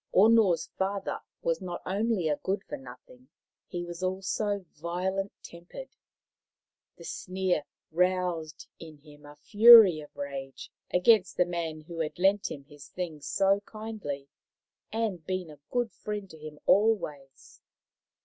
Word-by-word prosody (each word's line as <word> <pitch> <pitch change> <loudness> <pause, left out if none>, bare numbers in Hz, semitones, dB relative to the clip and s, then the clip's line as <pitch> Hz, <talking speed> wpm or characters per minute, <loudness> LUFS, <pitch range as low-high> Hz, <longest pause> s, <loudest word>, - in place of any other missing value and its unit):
Ono's 205 -5 +5
father 195 +1 -2 0.2
was 165 +1 0
not 180 -2 -5
only 200 -2 0
a 150 -1 +1
good 195 +1 -2
for - - -6
nothing, 135 - -14 0.4
he 175 -1 -4
was 175 0 -8
also 195 +2 -2
violent 185 +5 -2
tempered. 175 - -10 1.1
The - - -12
sneer 185 -5 -2 0.3
roused 175 -2 0
in 160 -2 -11
him 145 0 -16
a 145 - -13
fury 215 -3 +8
of 150 - -12
rage 135 -1 -7 0.2
against 185 0 +4
the 180 - +4
man 165 -3 -4
who 165 +2 -9
had 155 -2 -3
lent 195 +3 +2
him 140 - -8
his 145 0 -14
things 160 -5 -6
so 195 +3 +3
kindly 215 -11 -6 0.6
and 215 -7 -2
been 185 -2 -4
a 150 - -14
good 240 -2 -1
friend 210 0 -6
to 160 - -12
him 155 0 -9
always. 170 -11 0
180 Hz, 140 wpm, -29 LUFS, 155-200 Hz, 1.1 s, fury